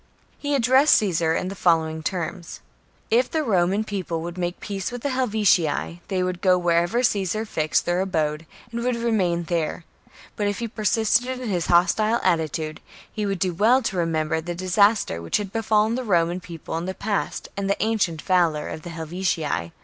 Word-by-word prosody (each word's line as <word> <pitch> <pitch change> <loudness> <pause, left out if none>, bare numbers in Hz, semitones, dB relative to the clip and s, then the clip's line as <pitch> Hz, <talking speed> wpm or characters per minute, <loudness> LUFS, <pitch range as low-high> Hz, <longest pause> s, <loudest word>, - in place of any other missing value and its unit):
He 285 0 -1
addressed 260 +3 +5
Caesar 165 -5 +1
in 185 - -2
the - - -5
following 160 -4 +1
terms: 175 +1 -4 0.3
— - - -37
if 245 +3 +3
the 315 -1 0
Roman 195 -3 +2
People 185 -6 -4
would 170 0 -6
make 175 -1 -3
peace 195 +1 -4
with 245 -1 -7
the 285 - 0
Helvetii, 205 - +1
they 185 -2 0
would 180 -1 -3
go 185 -1 +4
wherever 175 +6 +1
Caesar 210 -1 0
fixed 155 -7 0
their 175 +1 +1
abode, 160 -4 -1 0.2
and 235 0 -3
would 250 0 +1
remain 200 -8 0
there; 170 -1 -2 0.5
but 205 - -1
if 205 - -1
he 235 - -3
persisted 230 +3 +1
in 250 -3 -4
his 175 -4 -1
hostile 215 +7 +3
attitude, 160 -3 -1 0.3
he 210 -2 -2
would 195 -1 -1
do 180 0 0
well 235 +9 +3
to 205 - -2
remember 160 -2 0
the 175 +1 -5
disaster 185 - +2
which 85 - 0
had 200 -2 -5
befallen 220 0 +2
the 255 +2 -2
Roman 175 -4 +1
People 170 -2 -7
in 170 - -5
the 190 0 -4
past 205 +1 -3
and 200 -1 -2
the 200 - +1
ancient 205 -8 0
valour 170 -5 +1
of 155 - -6
the 175 - -8
Helvetii. 160 - -2
185 Hz, 190 wpm, -23 LUFS, 170-215 Hz, 0.5 s, addressed